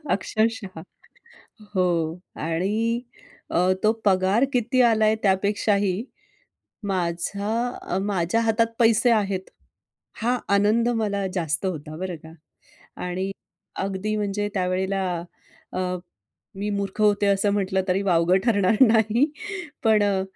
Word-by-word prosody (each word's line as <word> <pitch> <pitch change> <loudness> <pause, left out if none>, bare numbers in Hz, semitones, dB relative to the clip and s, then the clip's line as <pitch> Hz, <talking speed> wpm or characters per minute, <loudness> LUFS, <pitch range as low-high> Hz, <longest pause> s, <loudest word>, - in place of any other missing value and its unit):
अक्षरशः 200 -1 -1 0.9
हो. 175 -3 0 0.2
आणि 210 +9 -1 0.5
अ, 180 +2 +3
तो 215 - +5
पगार 190 +4 +3
किती 250 +1 +2
आलाय 220 -2 +4
त्यापेक्षाही 200 0 +1 0.9
माझा 200 +5 -2
माझ्या 195 +1 +1
हातात 225 0 +2
पैसे 230 0 +4
आहेत. 200 -4 +1 0.8
हा 245 +2 +1 0.2
आनंद 215 +4 +3
मला 210 -4 0
जास्त 165 -1 -1
होता, 155 -4 -5
बरं 180 0 -4
का. 160 +1 -14 0.7
आणि 185 +2 -2 0.5
अगदी 195 +2 -2
म्हणजे 205 0 -1
त्यावेळेला 190 +1 0 0.7
अ, - - -3 0.8
मी 205 +2 -3
मूर्ख 200 +1 -4
होते, 205 -1 +3
असं 200 +1 +2
म्हटलं 190 -1 0
तरी 185 +2 +1
वावगं 175 -1 +3
ठरणार 210 -3 +3
नाही. 225 +5 +3 0.5
पण 220 -2 +4
अ, 200 -2 +1
200 Hz, 110 wpm, -24 LUFS, 185-220 Hz, 0.9 s, तो